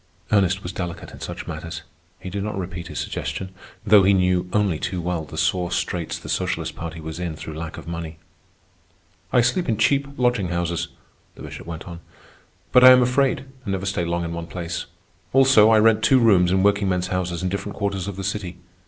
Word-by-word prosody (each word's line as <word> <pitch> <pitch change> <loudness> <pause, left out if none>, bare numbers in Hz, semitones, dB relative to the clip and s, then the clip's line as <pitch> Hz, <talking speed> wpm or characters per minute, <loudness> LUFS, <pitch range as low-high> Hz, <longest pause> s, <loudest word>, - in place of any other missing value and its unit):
Ernest 95 -1 +2
was 90 - -4
delicate 90 -3 -6
in - - -12
such - - -6
matters. 80 -1 -6 0.4
He 95 - -7
did 100 +1 -3
not 105 -1 -4
repeat 90 -2 -5
his - - -8
suggestion, 95 -1 -4 0.3
though 105 -1 +7
he 95 +1 +4
knew 90 -1 +2
only 100 -7 +1
too 90 -1 -3
well 85 -2 -2
the 75 +2 -10
sore 85 +3 0
straits 85 -2 -2
the - - -11
Socialist - - -2
Party 80 0 -6
was 80 +1 -7
in 85 -3 -3
through 80 +1 -8
lack 80 +1 -6
of - - -10
money. 85 -1 -5 1.1
"I 125 - +5
sleep 125 +7 0
in 110 - +1
cheap 140 +5 +2
lodging 120 -6 +1
houses," 85 -1 -2 0.5
the - - -11
Bishop - - -9
went 80 0 -7
on. 85 -1 -8 0.7
"But 125 - +6
I 130 - +12
am 125 0 +8
afraid, 130 +2 +1 0.2
and 100 - -3
never 95 0 -3
stay 95 -2 -1
long 85 0 -1
in 85 0 -4
one 85 0 -5
place. 85 -1 -5 0.5
Also, 130 -5 +6
I 110 - +6
rent 110 0 +4
two 130 +4 +5
rooms 100 -7 +4
in 95 0 +2
workingmen's 95 -3 +1
houses 90 -1 -2
in 95 - 0
different 100 +2 -4
quarters 100 -2 -2
of 100 - -4
the 95 - -6
city. 95 -3 -4
95 Hz, 205 wpm, -23 LUFS, 85-105 Hz, 1.1 s, I